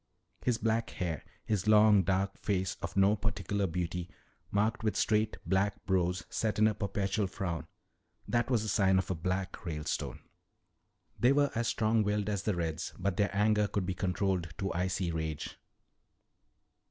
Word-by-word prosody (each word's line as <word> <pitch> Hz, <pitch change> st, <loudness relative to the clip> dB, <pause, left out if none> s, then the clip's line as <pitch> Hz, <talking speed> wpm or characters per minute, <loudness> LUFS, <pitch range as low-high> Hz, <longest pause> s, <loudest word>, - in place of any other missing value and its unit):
His 125 Hz, -3 st, +2 dB
black 115 Hz, 0 st, 0 dB
hair, 85 Hz, -4 st, -3 dB, 0.2 s
his 105 Hz, -2 st, -1 dB
long, 105 Hz, -1 st, +7 dB
dark 95 Hz, +2 st, 0 dB
face 95 Hz, -3 st, -1 dB
of -, -, -5 dB
no 100 Hz, +2 st, +5 dB
particular 100 Hz, -1 st, -1 dB
beauty 90 Hz, +1 st, -3 dB, 0.4 s
marked 110 Hz, +4 st, +1 dB
with 110 Hz, -, +1 dB
straight, 110 Hz, 0 st, +1 dB
black 95 Hz, +1 st, 0 dB
brows 90 Hz, -1 st, +1 dB
set 110 Hz, -1 st, -1 dB
in 110 Hz, -, +5 dB
a 110 Hz, -, +2 dB
perpetual 100 Hz, 0 st, -1 dB
frown 85 Hz, -3 st, -4 dB, 0.6 s
that 120 Hz, 0 st, +1 dB
was 120 Hz, -4 st, +2 dB
the -, -, -4 dB
sign 95 Hz, -3 st, +3 dB
of 95 Hz, 0 st, 0 dB
a -, -, +2 dB
"Black" 95 Hz, +3 st, -3 dB
Ralestone. 75 Hz, -3 st, -3 dB, 1.0 s
They 125 Hz, -, +5 dB
were 145 Hz, 0 st, +3 dB
as 115 Hz, 0 st, 0 dB
strong 110 Hz, 0 st, +2 dB
willed 105 Hz, 0 st, 0 dB
as 100 Hz, -2 st, -1 dB
the 105 Hz, -1 st, 0 dB
"Reds," 85 Hz, 0 st, -3 dB
but 95 Hz, 0 st, -1 dB
their 105 Hz, -, +2 dB
anger 105 Hz, 0 st, +3 dB
could 100 Hz, -2 st, -2 dB
be 95 Hz, -, -1 dB
controlled 90 Hz, -1 st, -1 dB
to 95 Hz, 0 st, -2 dB
icy 90 Hz, 0 st, -1 dB
rage. 80 Hz, -2 st, -4 dB
100 Hz, 165 wpm, -31 LUFS, 90-105 Hz, 1.0 s, long